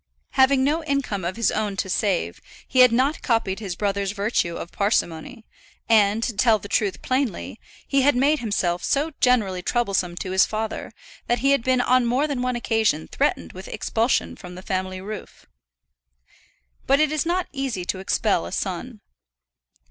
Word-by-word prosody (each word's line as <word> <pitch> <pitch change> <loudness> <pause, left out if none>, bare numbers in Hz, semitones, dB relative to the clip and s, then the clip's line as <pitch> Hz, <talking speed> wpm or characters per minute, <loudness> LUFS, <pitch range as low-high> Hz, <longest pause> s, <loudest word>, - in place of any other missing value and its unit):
Having 265 0 +4
no 310 +4 +1
income 275 - -1
of 175 +3 -3
his 230 0 +1
own 205 -2 -2
to 190 - -1
save, 190 -1 -1 0.3
he 260 - 0
had 250 -1 +8
not 265 +6 +1
copied 220 -5 0
his 195 -5 -5
brother's 200 0 -1
virtue 200 -4 -1
of 170 - -7
parsimony; 205 +2 -1 0.4
and, 215 0 +4
to 230 - -2
tell 220 +1 +4
the 205 - -10
truth 205 -2 -1
plainly, 255 -5 -2 0.3
had 275 0 +4
made 285 +4 +3
himself 180 -6 -1
so 295 +3 0
generally 210 -8 +2
troublesome 195 -5 0
to 185 +1 -5
his 190 0 +5
father, 220 0 -3 0.4
that 240 - +2
he 275 +1 +3
had 280 - +3
been 255 0 +2
on 250 -1 +3
more 255 +5 +2
than 280 -4 -2
one 250 0 -1
occasion 225 -9 0
threatened - - -1
with 185 +1 -9
expulsion 230 +3 0
from 180 -1 -11
the 185 - -10
family 185 -2 -3
roof. 210 +3 -9 1.4
But 275 +1 +4
it 305 -1 +3
is 305 -3 0
not 350 +2 0
easy 265 -10 -3
to 185 - -2
expel 195 -1 0
a - - -9
son. 200 +5 -4
225 Hz, 170 wpm, -23 LUFS, 190-260 Hz, 1.4 s, had